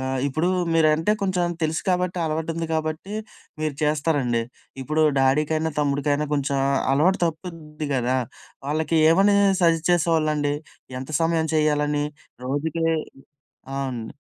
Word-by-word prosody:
ఆహ్, 130 0 -2
ఇప్పుడూ 155 +6 0 0.3
మీరంటే 160 +4 +3
కొంచం 180 -2 0
తెలుసు 155 0 0
కాబట్టి, 180 0 0
అలవాటుంది 160 +1 -2
కాబట్టి 155 +5 -3 0.5
మీరు 155 -2 -1
చేస్తారండి. 145 -6 +1 0.4
ఇప్పుడు 155 +3 0 0.2
డాడీకైనా, 155 +4 +2
తమ్ముడికైనా 145 +1 0
కొంచెం 140 -1 0 0.3
అలవాటు 175 +8 +3
తప్పుద్ది 155 -2 -6
గదా! 125 0 +1 0.5
వాళ్ళకి 160 +2 0
ఏమనీ 200 +4 +4 0.3
సజెస్ట్ 165 -1 +3
చేసేవాళ్ళండి? 155 -4 +1 0.5
ఎంత 135 +3 -8
సమయం 165 -1 +1
చెయ్యాలని 150 -1 +1 0.4
రోజుకీ 155 +4 -2 0.9
అవునండి. 130 -5 -4
155 Hz, 110 wpm, -23 LUFS, 145-165 Hz, 0.9 s, ఏమనీ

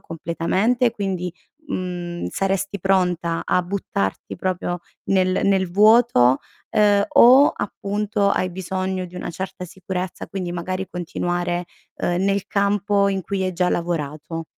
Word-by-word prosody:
completamente, 190 +9 0
quindi, 190 -5 -3 0.4
mhmm, 175 -4 -4
saresti 195 +4 -1
pronta 180 -3 +1
a 180 - +2
buttarti 175 - -3
proprio 180 -1 -2 0.3
nel 185 -1 +2
nel 190 -2 +2
vuoto, 210 - +5 0.3
ehm, 205 -1 +4
o 260 +4 +7
appunto, 205 0 -1
hai 185 - 0
bisogno 185 +1 -3
di 180 - -12
una - - -4
certa 185 +1 -6
sicurezza 185 +1 -5
quindi 180 -2 -4
magari 185 +2 -3
continuare, 175 0 -2 0.3
uhm, 175 +1 -1
nel 195 0 0
campo 200 0 +1
in 195 -1 -1
cui 195 +1 -2
hai 185 0 -1
già 180 0 +1
lavorato? 165 -1 -3
185 Hz, 130 wpm, -22 LUFS, 175-200 Hz, 0.4 s, o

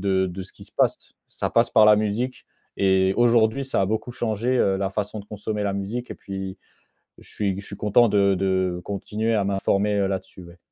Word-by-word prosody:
de 95 -1 +1
de 95 +1 -6
ce 95 - -14
qui - - -14
se - - -17
passe. - - +2 0.3
Ça - - -3
passe - - +3
par 110 - +6
la 105 0 +7
musique 110 +5 -2 0.3
et 95 -1 +3
aujourd'hui, 120 +2 +3
ça 135 - -1
a 95 - +2
beaucoup 110 +3 -2
changé, 120 +2 -1
heu, 95 -4 +2
la 95 0 -1
façon 105 +2 -3
de 100 - -13
consommer 105 0 -4
la 100 - 0
musique, 105 +6 -4
et - - -4
puis, 95 -1 -7 0.6
je - - -16
suis 100 -2 -2
je - - -13
suis - - -8
content 110 +3 +4
de 100 -1 +3
de 95 -1 0
continuer 110 +3 -2
à 105 - +1
m'informer, 100 +1 +1
heu, 100 - +2
là-dessus, 95 -1 -5
ouais. 85 0 -14
100 Hz, 220 wpm, -24 LUFS, 95-110 Hz, 0.6 s, la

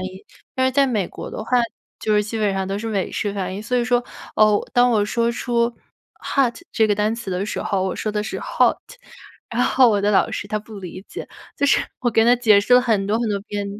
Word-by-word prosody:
音。 185 - -3 0.5
但 260 0 +2
是 260 - 0
在 275 +1 +4
美 215 -8 0
国 - - -8
的 215 - -6
话， - - -12 0.5
就 215 - +1
是 210 - +3
基 220 +2 -4
本 205 -2 +1
上 190 0 -2
都 195 +1 -3
是 225 - -4
美 200 -4 -2
式 205 -1 -2
发 190 -2 -3
音。 195 +3 -6
所 250 +3 -1
以 240 - +1
说， 245 0 +2 0.3
哦， 215 -1 +3
当 245 0 +4
我 215 -3 +2
说 230 +2 0
出 235 0 0 0.5
hot 260 -4 +1 0.2
这 220 - +3
个 210 - +2
单 210 +2 0
词 230 -4 -6
的 185 +1 -1
时 215 - -4
候， 195 -2 -1
我 190 -1 -1
说 215 - -3
的 210 0 -2
是 215 - -5
hot。 - - +2 0.7
然 235 +2 0
后 255 -2 +5
我 210 -2 +2
的 205 +1 +2
老 200 - +3
师 - - -4
他 215 +1 -2
不 215 -1 -11
理 185 0 -8
解， - - -7 0.3
就 - - 0
是 285 - +4 0.2
我 245 - +1
给 225 0 +3
他 240 +2 +5
解 220 -4 +5
释 225 +5 +3
了 250 - +6
很 215 -5 +1
多 215 +2 +1
很 235 - -1
多 200 -1 -1
遍 205 -1 -3
215 Hz, 290 characters per minute, -21 LUFS, 200-240 Hz, 0.7 s, 了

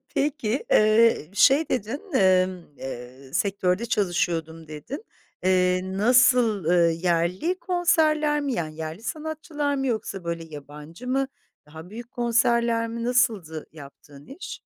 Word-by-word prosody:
Peki, 275 -4 -1
eee, 215 -6 +4
şey 280 +8 +4
dedin, 250 +4 -2
emm, 185 -4 +3
eee, 130 +1 -9
"Sektörde 195 +2 0
çalışıyordum." 165 -5 -1
dedin. 155 - -7 0.4
Eee, 185 -1 +3
nasıl, 230 +1 +3
eee, 170 0 +3
yerli 180 - +1
konserler 310 -5 +2
mi, 285 -2 -2
yani, 155 -5 -4
yerli 160 +5 -6
sanatçılar 300 +1 -3
mı 270 -1 -2
yoksa, 210 -6 -3
böyle, 170 -1 -4
yabancı 150 - -10
mı? 270 +1 0 0.4
Daha 160 +4 -12
büyük 235 +3 -9
konserler 235 -1 +1
mi? 230 0 -5
Nasıldı 220 -11 0
yaptığın 145 -1 -14
iş? 295 +8 -9
205 Hz, 120 wpm, -25 LUFS, 165-250 Hz, 0.4 s, eee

